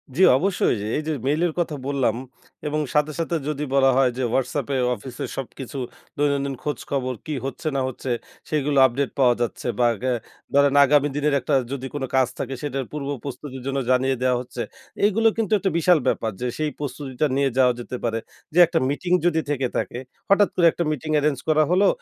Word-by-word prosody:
জি 180 Hz, -, +1 dB, 0.2 s
অবশ্যই। 185 Hz, -3 st, +1 dB, 0.2 s
এই -, -, -1 dB
যে -, -, 0 dB, 0.2 s
মেইল 150 Hz, +3 st, +1 dB
এর 165 Hz, -, -4 dB
কথা 160 Hz, -3 st, -1 dB
বললাম 135 Hz, -6 st, +1 dB, 0.5 s
এবং 150 Hz, +1 st, -1 dB
সাথে, 150 Hz, 0 st, +2 dB
সাথে 165 Hz, +1 st, -1 dB
যদি 150 Hz, 0 st, -2 dB
বলা 135 Hz, -1 st, +5 dB
হয় 130 Hz, -2 st, +4 dB
যে 130 Hz, -, -1 dB
WhatsApp 135 Hz, +1 st, 0 dB
এ -, -, +2 dB, 0.2 s
অফিস 125 Hz, 0 st, -10 dB
এ -, -, -1 dB
সবকিছু 135 Hz, +1 st, -6 dB, 0.4 s
দৈনন্দিন 140 Hz, -1 st, 0 dB
খোঁজ 145 Hz, -4 st, -2 dB
খবর 130 Hz, -2 st, 0 dB
কি 155 Hz, -, -3 dB
হচ্ছে, 135 Hz, +3 st, -5 dB
না 135 Hz, -, +1 dB
হচ্ছে 130 Hz, 0 st, -6 dB, 0.4 s
সেগুলো 150 Hz, -2 st, 0 dB
আপডেট 130 Hz, +2 st, 0 dB
পাওয়া 125 Hz, -3 st, +5 dB
যাচ্ছে 120 Hz, -, -2 dB
বা 120 Hz, -, +5 dB, 0.2 s
গা 130 Hz, -, +1 dB, 0.4 s
ধরেন 140 Hz, 0 st, +4 dB
আগামী 145 Hz, +1 st, +3 dB
দিনের 150 Hz, 0 st, +1 dB
একটা 135 Hz, +3 st, 0 dB, 0.2 s
যদি 135 Hz, -1 st, -4 dB
কোন 145 Hz, -, -3 dB
কাজ 130 Hz, -2 st, +4 dB
থাকে 135 Hz, 0 st, -3 dB
সেটার 135 Hz, -3 st, -3 dB
পূর্ব 150 Hz, -2 st, -4 dB, 0.2 s
প্রস্তুতির 135 Hz, -1 st, -7 dB
জন্য 135 Hz, 0 st, 0 dB
জানিয়ে 130 Hz, +1 st, +2 dB
দেয়া 125 Hz, -1 st, +3 dB
হচ্ছে। 125 Hz, -1 st, -7 dB, 0.4 s
এগুলো 225 Hz, +2 st, +3 dB
কিন্তু 220 Hz, -3 st, -1 dB
একটা 195 Hz, -, 0 dB
বিশাল 170 Hz, -1 st, +4 dB
ব্যাপার 115 Hz, -3 st, 0 dB
যে 125 Hz, -, 0 dB
সেই 155 Hz, -1 st, 0 dB
প্রস্তুতিটা 140 Hz, 0 st, -2 dB
নিয়ে 140 Hz, 0 st, +2 dB
যাওয়া 125 Hz, -2 st, +5 dB
যেতে 125 Hz, +1 st, -5 dB
পারে। 115 Hz, -1 st, 0 dB, 0.3 s
যে 175 Hz, -, +3 dB
একটা 165 Hz, 0 st, +1 dB
মিটিং 175 Hz, +5 st, -3 dB
যদি 160 Hz, -2 st, +3 dB
থেকে 135 Hz, -3 st, 0 dB
থাকে, 120 Hz, -, -3 dB, 0.3 s
হঠাৎ 200 Hz, 0 st, +5 dB
করে 175 Hz, -, +3 dB
একটা 170 Hz, -, -2 dB
মিটিং 155 Hz, +1 st, -3 dB
এরেঞ্জ 145 Hz, -1 st, +1 dB
করা 155 Hz, -1 st, +4 dB
হলো 190 Hz, +3 st, +4 dB
140 Hz, 200 wpm, -23 LUFS, 130-155 Hz, 0.5 s, বলা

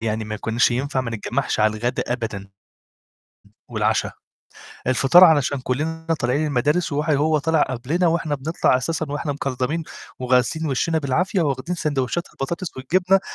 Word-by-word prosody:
يعني 110 Hz, -1 st, -2 dB
ما 110 Hz, 0 st, -5 dB
كناش 115 Hz, +3 st, +1 dB
ينفع 130 Hz, +2 st, -1 dB
ما 125 Hz, -2 st, -4 dB
نتجمّعش 115 Hz, +3 st, -2 dB
على 110 Hz, 0 st, +2 dB
الغدا 120 Hz, +3 st, -1 dB
أبدًا 100 Hz, -5 st, -5 dB, 1.2 s
والعشا، -, -, 0 dB, 0.8 s
الفطار 135 Hz, +7 st, +6 dB
علشان 145 Hz, -5 st, +3 dB
كلّنا 160 Hz, +6 st, -2 dB
طالعين 130 Hz, +6 st, +1 dB
المدارس 150 Hz, +5 st, 0 dB
وح 150 Hz, +2 st, -1 dB
وهو 155 Hz, +1 st, +2 dB
طلع 160 Hz, +1 st, +2 dB
قبلنا 135 Hz, +8 st, 0 dB
وإحنا 165 Hz, -3 st, 0 dB
بنطلع 145 Hz, -1 st, +1 dB
أساسًا 160 Hz, +5 st, -2 dB
وإحنا 145 Hz, 0 st, -2 dB
مكلضمين 140 Hz, +3 st, -2 dB, 0.4 s
وغاسلين 125 Hz, +5 st, +1 dB
وِشّينا 160 Hz, +4 st, 0 dB
بالعافية 170 Hz, -, 0 dB
وواخدين 145 Hz, +3 st, -2 dB
ساندويتشات 150 Hz, +1 st, -2 dB
البطاطس 170 Hz, +6 st, -5 dB
والجبنة، 180 Hz, +8 st, +2 dB
140 Hz, 140 wpm, -22 LUFS, 125-160 Hz, 1.2 s, الفطار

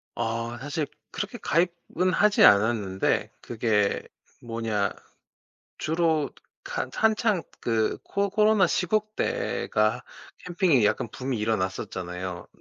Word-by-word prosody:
어. 115 Hz, +1 st, -2 dB
사실 145 Hz, +3 st, -2 dB, 0.3 s
그렇게 -, -, -4 dB
가입은 175 Hz, +1 st, 0 dB
하지 210 Hz, +3 st, +4 dB
않았는데 100 Hz, -2 st, +3 dB
그게 110 Hz, -3 st, 0 dB, 0.4 s
뭐냐 115 Hz, -4 st, -1 dB, 0.9 s
주로 160 Hz, -2 st, +1 dB, 0.3 s
가 -, -, -3 dB
한창 215 Hz, -4 st, +2 dB, 0.2 s
그 110 Hz, -2 st, 0 dB
코 200 Hz, 0 st, -1 dB
코로나 210 Hz, -1 st, +4 dB
시국 215 Hz, +4 st, 0 dB
때가 -, -, 0 dB, 0.4 s
캠핑이 175 Hz, -, +3 dB
약간 110 Hz, -, +1 dB
붐이 130 Hz, -2 st, -3 dB
일어났었잖아요. 95 Hz, -4 st, -3 dB
130 Hz, 225 characters per minute, -26 LUFS, -, 0.9 s, 하지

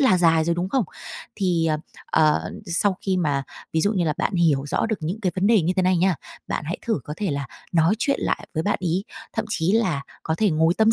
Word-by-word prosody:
là 255 Hz, -10 st, +5 dB
dài 165 Hz, -2 st, +4 dB
rồi, 170 Hz, +1 st, +1 dB
đúng 175 Hz, +2 st, -2 dB
không? 255 Hz, -1 st, +1 dB, 0.5 s
Thì, 175 Hz, -5 st, +1 dB
ờ, 155 Hz, -, +2 dB, 0.3 s
ờ, 155 Hz, -1 st, +2 dB, 0.2 s
sau 185 Hz, +3 st, +1 dB
khi 190 Hz, -2 st, 0 dB
mà 145 Hz, -6 st, +1 dB, 0.3 s
ví 160 Hz, -, +2 dB
dụ 205 Hz, +5 st, +2 dB
như 180 Hz, -4 st, +1 dB
là 155 Hz, -, +1 dB
bạn 200 Hz, -, 0 dB
hiểu 150 Hz, -5 st, +2 dB
rõ 185 Hz, -, 0 dB
được 220 Hz, -2 st, -1 dB
những 175 Hz, +8 st, -3 dB
cái 185 Hz, -4 st, 0 dB
vấn 190 Hz, +2 st, +2 dB
đề 220 Hz, -3 st, +5 dB
như 175 Hz, +3 st, +1 dB
thế 185 Hz, -, +3 dB
này 185 Hz, 0 st, +3 dB
nha, 185 Hz, +1 st, +3 dB, 0.3 s
bạn -, -, -2 dB
hãy 170 Hz, -, -3 dB
thử 225 Hz, -, +1 dB
có 150 Hz, -, -5 dB
thể 200 Hz, -6 st, -1 dB
là 140 Hz, -2 st, -2 dB, 0.3 s
nói 165 Hz, +3 st, +4 dB
chuyện 280 Hz, +2 st, +1 dB
lại -, -, -1 dB
với 160 Hz, -, 0 dB
bạn 205 Hz, -, 0 dB
ấy, 180 Hz, +3 st, 0 dB, 0.3 s
thậm 220 Hz, -, -1 dB
chí 185 Hz, -3 st, +1 dB
là 185 Hz, -11 st, +1 dB, 0.2 s
có 160 Hz, -, -1 dB
thể 210 Hz, +3 st, +2 dB
ngồi 160 Hz, +2 st, +3 dB
tâm 220 Hz, +1 st, +4 dB
175 Hz, 255 wpm, -23 LUFS, 160-200 Hz, 0.5 s, là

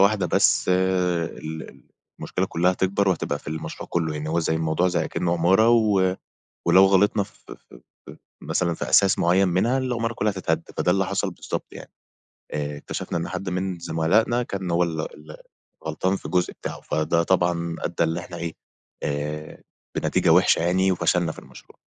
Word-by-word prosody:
واحدة 100 Hz, -1 st, +4 dB
بس 85 Hz, -, +3 dB
ال 90 Hz, -4 st, -1 dB, 0.4 s
المشكلة -, -, -2 dB
كلها 90 Hz, +2 st, +2 dB
هتكبر 95 Hz, +2 st, +1 dB
وهتبقى 90 Hz, -, -1 dB
في -, -, -11 dB
المشروع 80 Hz, 0 st, -6 dB
كله 80 Hz, -3 st, 0 dB
يعني، 75 Hz, 0 st, -4 dB
هو 85 Hz, -, 0 dB
زي 80 Hz, -, 0 dB
الموضوع 80 Hz, +3 st, +1 dB
زي 85 Hz, -2 st, 0 dB
أكنّة 85 Hz, -1 st, -1 dB
عمارة 95 Hz, +6 st, +4 dB
و 100 Hz, -5 st, +3 dB, 0.5 s
ولو 95 Hz, +3 st, +7 dB
غلطنا 100 Hz, +2 st, +3 dB
ف -, -, -15 dB, 0.2 s
ف -, -, -7 dB, 0.5 s
ف -, -, -10 dB, 0.3 s
مثلًا 85 Hz, -2 st, 0 dB
في -, -, -4 dB
أساس 100 Hz, -1 st, +4 dB
معيّن 95 Hz, +3 st, +3 dB
منها، 105 Hz, +9 st, +2 dB
العمارة 120 Hz, -3 st, -1 dB
كلها 105 Hz, -1 st, 0 dB
هتتهد. 85 Hz, -4 st, -1 dB
فده 90 Hz, -, +2 dB
اللي 95 Hz, +1 st, +2 dB
حصل 100 Hz, 0 st, -1 dB
بالضبط -, -, -5 dB
يعني، -, -, -11 dB, 0.6 s
آآ، 75 Hz, -1 st, -3 dB
اكتشفنا 75 Hz, -, -4 dB
إن 85 Hz, -, -3 dB
حد 95 Hz, +2 st, -4 dB
من 90 Hz, 0 st, -2 dB
زُملائنا 95 Hz, +10 st, +1 dB
كان 95 Hz, -6 st, -4 dB
هو 85 Hz, +1 st, +2 dB
اللي 80 Hz, -2 st, -1 dB
اللي 75 Hz, 0 st, -12 dB, 0.5 s
غلطان 90 Hz, +5 st, 0 dB
في -, -, -9 dB
الجزء 90 Hz, -1 st, 0 dB
بتاعه، -, -, -7 dB
فده 80 Hz, +2 st, 0 dB
طبعًا 85 Hz, -2 st, 0 dB
أدّى 85 Hz, -, 0 dB
اللي 80 Hz, +2 st, -1 dB
إحنا 85 Hz, 0 st, -9 dB
إيه، 85 Hz, -1 st, -4 dB, 0.5 s
آآ 75 Hz, +1 st, -4 dB, 0.3 s
بنتيجة -, -, +1 dB
وحشة -, -, +5 dB
يعني 95 Hz, +2 st, +2 dB
وفشلنا 90 Hz, -2 st, +1 dB
في -, -, -16 dB
المشروع. -, -, -16 dB
90 Hz, 175 wpm, -24 LUFS, 80-95 Hz, 0.6 s, ولو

